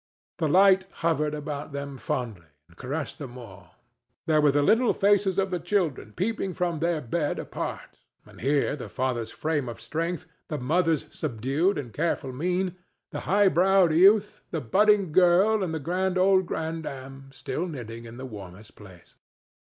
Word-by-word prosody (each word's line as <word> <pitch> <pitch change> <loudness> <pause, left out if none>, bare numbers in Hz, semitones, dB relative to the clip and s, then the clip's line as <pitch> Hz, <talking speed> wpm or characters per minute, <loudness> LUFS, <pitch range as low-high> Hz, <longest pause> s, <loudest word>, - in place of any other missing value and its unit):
The 160 - +1
light 190 +3 +5 0.2
hovered 150 -2 +1
about 150 -1 -6
them 140 0 -5
fondly 115 -9 -4 0.2
and 85 - -22
caressed 140 - -5
them 130 -4 -8
all. 115 -7 -13 0.5
There 155 -1 +3
were 150 - +5
the 145 +1 +2
little 225 - +4
faces 200 -2 +2
of 195 -1 +1
the 180 - -1
children 170 - -1
peeping 195 - -2
from 175 -3 -1
their 165 -1 0
bed 145 +5 -2
apart, - - -6 0.3
and - - -15
here 140 +3 +1
the 140 - -8
father's 125 -3 -2
frame 150 -5 -2
of 115 - -8
strength, 165 +8 -3 0.2
the 150 - -3
mother's 160 +3 +1
subdued 145 - 0
and 125 -6 -6
careful 155 -4 -1
mien, 180 +5 -1 0.3
the - - -4
high 200 +2 +5
browed 185 -1 +4
youth, 200 +5 +4
the 165 - -2
budding 195 - +3
girl 185 +5 +4
and 175 - -2
the 160 - -2
good 185 +5 -1
old 190 -1 +4
grandam, 135 -5 -5
still 160 +6 -4
knitting 115 -7 -7
in 115 +1 -10
the 130 - -7
warmest 105 -3 -11
place. 95 -5 -16
155 Hz, 165 wpm, -26 LUFS, 130-185 Hz, 0.5 s, light